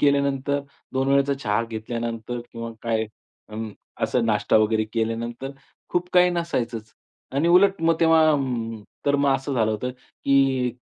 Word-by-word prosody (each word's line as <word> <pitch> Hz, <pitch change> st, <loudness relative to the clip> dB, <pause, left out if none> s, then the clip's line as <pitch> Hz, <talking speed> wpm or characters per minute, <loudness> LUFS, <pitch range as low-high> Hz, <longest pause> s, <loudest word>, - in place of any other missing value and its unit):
केल्यानंतर, 140 Hz, 0 st, +2 dB, 0.3 s
2 135 Hz, +1 st, 0 dB
वेळेचा 140 Hz, 0 st, +3 dB
चहा 115 Hz, -5 st, 0 dB
घेतल्यानंतर 115 Hz, +1 st, -4 dB
किंवा 115 Hz, 0 st, -5 dB
काय 115 Hz, -1 st, 0 dB, 0.4 s
अंम, 110 Hz, 0 st, -5 dB, 0.3 s
असा 125 Hz, -, +2 dB
नाश्ता 110 Hz, -3 st, +2 dB
वगैरे 110 Hz, 0 st, +2 dB
केल्यानंतर 115 Hz, +3 st, -2 dB, 0.4 s
खूप 175 Hz, 0 st, 0 dB
काही 180 Hz, 0 st, +6 dB
नसायचंच 125 Hz, -10 st, -3 dB, 0.4 s
आणि 150 Hz, +5 st, +2 dB
उलट 190 Hz, +1 st, +5 dB
मग 165 Hz, 0 st, +4 dB
तेव्हा 165 Hz, -1 st, +5 dB
अं, 120 Hz, -6 st, -2 dB, 0.2 s
तर 145 Hz, 0 st, +4 dB
मग 140 Hz, -1 st, +3 dB
असं 135 Hz, +1 st, -2 dB
झालं 110 Hz, -3 st, +2 dB
होतं, 110 Hz, +4 st, -2 dB
की 130 Hz, 0 st, +1 dB
125 Hz, 145 wpm, -24 LUFS, 115-140 Hz, 0.4 s, काही